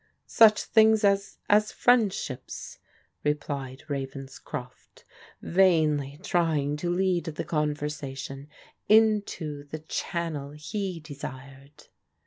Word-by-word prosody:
" -, -, -50 dB
Such 220 Hz, -2 st, +5 dB
things 220 Hz, -1 st, +4 dB
as 200 Hz, 0 st, +2 dB
— -, -, -41 dB
as 210 Hz, +1 st, +4 dB
friendships," 210 Hz, -, 0 dB, 0.4 s
replied 140 Hz, -2 st, -3 dB
Ravens 135 Hz, -1 st, -5 dB
croft, 125 Hz, -1 st, -9 dB, 0.4 s
vainly 155 Hz, -6 st, +2 dB
trying 155 Hz, -5 st, +1 dB
to 175 Hz, +3 st, -3 dB
lead 180 Hz, 0 st, +1 dB
the 155 Hz, -2 st, -4 dB
conversation 145 Hz, -3 st, -3 dB, 0.4 s
into 205 Hz, -9 st, +2 dB
the 150 Hz, +2 st, -6 dB
channel 155 Hz, -2 st, -4 dB
he 175 Hz, +4 st, -4 dB
desired. 140 Hz, -1 st, -10 dB
150 Hz, 105 wpm, -27 LUFS, 140-190 Hz, 0.4 s, Such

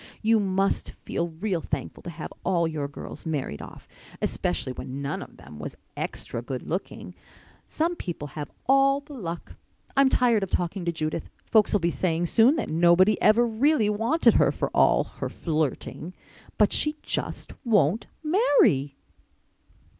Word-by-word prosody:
You 225 Hz, 0 st, +4 dB
must 195 Hz, 0 st, 0 dB
feel 170 Hz, -, -1 dB
real 170 Hz, +2 st, -2 dB
thankful 145 Hz, -4 st, -5 dB
to -, -, -7 dB
have 160 Hz, -2 st, -7 dB
all 175 Hz, -3 st, +2 dB
your 150 Hz, -3 st, -3 dB
girls 145 Hz, +3 st, -9 dB
married 140 Hz, -, -3 dB
off—especially 90 Hz, +9 st, -4 dB
when 130 Hz, +2 st, -6 dB
none 140 Hz, 0 st, -3 dB
of -, -, -11 dB
them 75 Hz, -, -12 dB
was 75 Hz, -, -6 dB, 0.2 s
extry 115 Hz, -, -4 dB
good 125 Hz, +1 st, -5 dB
looking. 180 Hz, +4 st, -5 dB, 0.5 s
Some 335 Hz, +3 st, -1 dB
people 165 Hz, -, -5 dB
have 145 Hz, 0 st, -6 dB, 0.2 s
all 275 Hz, +1 st, +4 dB
the 295 Hz, +1 st, -13 dB
luck. 175 Hz, -10 st, -6 dB, 0.4 s
I'm 275 Hz, -1 st, +5 dB
tired 240 Hz, -5 st, +3 dB
of 195 Hz, -, -3 dB
talking 175 Hz, +1 st, -2 dB
to 170 Hz, -, +1 dB
Judith. 155 Hz, -1 st, -3 dB, 0.2 s
Folks'll 215 Hz, -2 st, +4 dB
be 170 Hz, -2 st, 0 dB
saying 170 Hz, -1 st, 0 dB
soon 230 Hz, -, +4 dB
that -, -, -2 dB
nobody 175 Hz, +5 st, +4 dB
ever 230 Hz, +3 st, +5 dB
really 230 Hz, -1 st, +2 dB
wanted 230 Hz, +11 st, +3 dB
her, -, -, +4 dB
for -, -, -3 dB
all -, -, +5 dB
her -, -, -6 dB
flirting. 160 Hz, +2 st, -3 dB, 0.4 s
But 210 Hz, -, +4 dB
she 300 Hz, 0 st, +2 dB
just -, -, -4 dB
won't 205 Hz, -, +2 dB, 0.2 s
marry." 290 Hz, -, +3 dB
180 Hz, 155 wpm, -26 LUFS, 155-230 Hz, 0.5 s, I'm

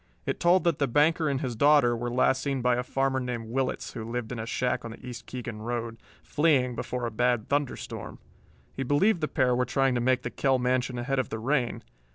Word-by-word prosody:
It -, -, -2 dB
told 175 Hz, +2 st, +4 dB
that 170 Hz, -4 st, +1 dB
the 140 Hz, -, +2 dB
banker 155 Hz, +4 st, +3 dB
and 135 Hz, -2 st, -1 dB
his 125 Hz, -3 st, -3 dB
daughter 140 Hz, -1 st, +4 dB
were 120 Hz, +1 st, -3 dB
last 130 Hz, +2 st, +2 dB
seen 135 Hz, -3 st, -2 dB
by 125 Hz, -1 st, +3 dB
a 125 Hz, -, 0 dB
farmer 135 Hz, +1 st, 0 dB
named 120 Hz, -3 st, -4 dB
Willetts 130 Hz, +1 st, -2 dB
who 115 Hz, -, -5 dB
lived 115 Hz, 0 st, -4 dB
in 125 Hz, -, -4 dB
a 110 Hz, -, -5 dB
shack 125 Hz, +1 st, -1 dB
on 115 Hz, -, -6 dB
the 115 Hz, -, -11 dB
East 120 Hz, -2 st, -8 dB
Keegan 120 Hz, -3 st, -6 dB
road, 115 Hz, 0 st, -3 dB, 0.3 s
fleeing 140 Hz, -5 st, +2 dB
before 125 Hz, 0 st, -3 dB
a 115 Hz, -, -3 dB
bad 120 Hz, 0 st, 0 dB
thunder 145 Hz, -1 st, 0 dB
storm. -, -, -8 dB, 0.6 s
He -, -, -4 dB
believed 165 Hz, -, +2 dB
the 155 Hz, -, +1 dB
pair 130 Hz, -5 st, +2 dB
were 125 Hz, -, +2 dB
trying 135 Hz, +1 st, +1 dB
to 120 Hz, -, 0 dB
make 130 Hz, +1 st, +2 dB
the -, -, -4 dB
Kell 135 Hz, -2 st, +2 dB
mansion 125 Hz, 0 st, 0 dB
ahead 135 Hz, +3 st, -1 dB
of 130 Hz, -, -1 dB
the 110 Hz, -, -4 dB
rain. 125 Hz, +1 st, -1 dB
125 Hz, 230 wpm, -27 LUFS, 120-135 Hz, 0.6 s, told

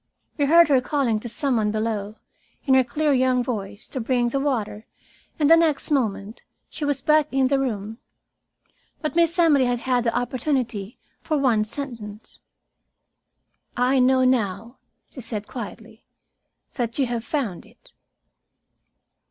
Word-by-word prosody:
We 290 Hz, -, +1 dB
heard 335 Hz, +4 st, +6 dB
her 270 Hz, -3 st, +3 dB
calling 255 Hz, -5 st, 0 dB
to 235 Hz, -, -7 dB
some 265 Hz, +1 st, -1 dB
one 215 Hz, -1 st, +1 dB
below, 215 Hz, -1 st, -3 dB, 0.5 s
in 270 Hz, -, +3 dB
her 260 Hz, 0 st, +6 dB
clear 300 Hz, +3 st, 0 dB
young 255 Hz, -1 st, +2 dB
voice, 205 Hz, -4 st, -5 dB
to 260 Hz, -, -4 dB
bring 240 Hz, +1 st, +1 dB
the 275 Hz, -, -1 dB
water, 230 Hz, -6 st, -2 dB, 0.5 s
and 295 Hz, -, +2 dB
the 330 Hz, -, +8 dB
next 320 Hz, -3 st, +1 dB
moment 220 Hz, -6 st, -1 dB, 0.3 s
she -, -, -6 dB
was 285 Hz, -2 st, -1 dB
back 305 Hz, -1 st, +3 dB
in 265 Hz, -1 st, +2 dB
the 275 Hz, -1 st, +2 dB
room. 220 Hz, -3 st, -3 dB, 1.0 s
But 305 Hz, -, -2 dB
Miss 335 Hz, 0 st, +2 dB
Emily 305 Hz, -6 st, +4 dB
had 245 Hz, -1 st, -1 dB
had 250 Hz, -2 st, +1 dB
the 230 Hz, 0 st, 0 dB
opportunity 245 Hz, -4 st, -2 dB, 0.2 s
for 310 Hz, -, -1 dB
one 240 Hz, -6 st, +2 dB
sentence. 220 Hz, -4 st, -8 dB, 1.4 s
"I 255 Hz, +2 st, +2 dB
know 260 Hz, +1 st, +4 dB
now," 230 Hz, -1 st, -1 dB, 0.3 s
she 260 Hz, -, -10 dB
said 215 Hz, -3 st, -5 dB
quietly, 225 Hz, -1 st, -9 dB, 0.7 s
"that 235 Hz, -3 st, -3 dB
you 275 Hz, -, +2 dB
have 235 Hz, -2 st, -3 dB
found 235 Hz, -, -3 dB
it." -, -, -21 dB
250 Hz, 150 wpm, -23 LUFS, 225-275 Hz, 1.4 s, the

